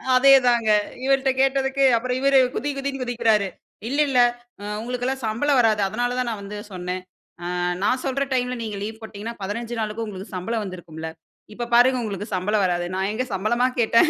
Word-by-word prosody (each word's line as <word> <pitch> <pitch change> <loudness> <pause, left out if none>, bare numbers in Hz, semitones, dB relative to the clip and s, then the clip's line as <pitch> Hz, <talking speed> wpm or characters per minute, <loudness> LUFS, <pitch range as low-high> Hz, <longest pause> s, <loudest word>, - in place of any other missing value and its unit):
அதேதாங்க 250 -4 +5 0.3
இவர்ட்ட 270 0 +3
கேட்டதுக்கு 270 0 +2
அப்புறம் 250 +2 -2
இவர் 275 0 +4 0.2
குதி, 290 - -1
குதின்னு 275 -1 -3
குதிக்கிறாரு. 225 -4 +2 0.4
இல்ல, 280 - -1
இல்ல 255 - +3 0.4
அ - - -8 0.2
உங்களுக்கெல்லாம் 250 +2 -3
சம்பளம் 250 +5 +2
வராது 215 -3 +3
அதனால 245 +4 -1
தான் 250 -1 0
நான் 215 -3 -4
வந்து 205 +1 -7 0.2
சொன்னேன். 180 0 -4 0.4
அ - - -5 0.4
நான் 255 +5 +2
சொல்ற 275 +1 0
டைம்ல 250 -1 0
நீங்க 215 -2 -4
லீவ் 220 +1 -6
போட்டீங்கன்னா 220 +1 -7
15 230 +4 -4
நாளுக்கு 215 +1 -3
உங்களுக்கு 195 0 -8
சம்பளம் 220 +4 -2
வந்திருக்கும்ல. 165 -3 -7 0.5
இப்ப 240 +1 -4
பாருங்க 250 +1 +5
உங்களுக்கு 205 0 -5
சம்பளம் 205 +3 +1
வராது. 175 -1 0
நான் 190 +1 0
எங்கே 255 +3 -2
சம்பளமா 235 +6 +1
கேட்டேன். 230 +7 +5
230 Hz, 170 wpm, -23 LUFS, 205-255 Hz, 0.5 s, அதேதாங்க